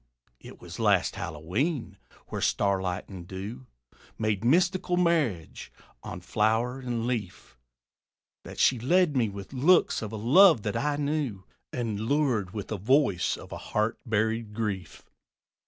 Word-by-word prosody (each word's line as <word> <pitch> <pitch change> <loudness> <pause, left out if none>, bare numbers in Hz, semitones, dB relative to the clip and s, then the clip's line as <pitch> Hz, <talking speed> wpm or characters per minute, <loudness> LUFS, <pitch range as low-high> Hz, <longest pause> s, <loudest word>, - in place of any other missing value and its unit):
It - - -13
was - - -10
last - - +3
Hallowe'en 100 - -3 0.3
where - - -4
starlight 95 -2 0
and 90 -3 -9
dew 105 +7 -7 0.5
Made 110 -2 -1
mystical 175 +6 +2
marriage 155 - 0 0.3
on - - -7
flower 115 +4 0
and 120 -3 -3
leaf, 105 - -4 0.9
That - - -10
she 125 - +3
led 170 +5 +3
me 120 -4 +2
with 100 +4 -9
looks 155 +8 +3
of 110 -2 -5
a - - -5
love 135 - +6
that 105 - -2
I 150 0 0
knew, 145 -9 -2 0.3
And 115 -5 -3
lured 120 -5 +1
with 105 0 -6
the 110 - -2
voice 115 - +2
of - - -12
a - - -5
heart 110 +2 -1
buried 110 -1 -1
grief. 100 -7 -4
115 Hz, 140 wpm, -27 LUFS, 100-140 Hz, 0.9 s, love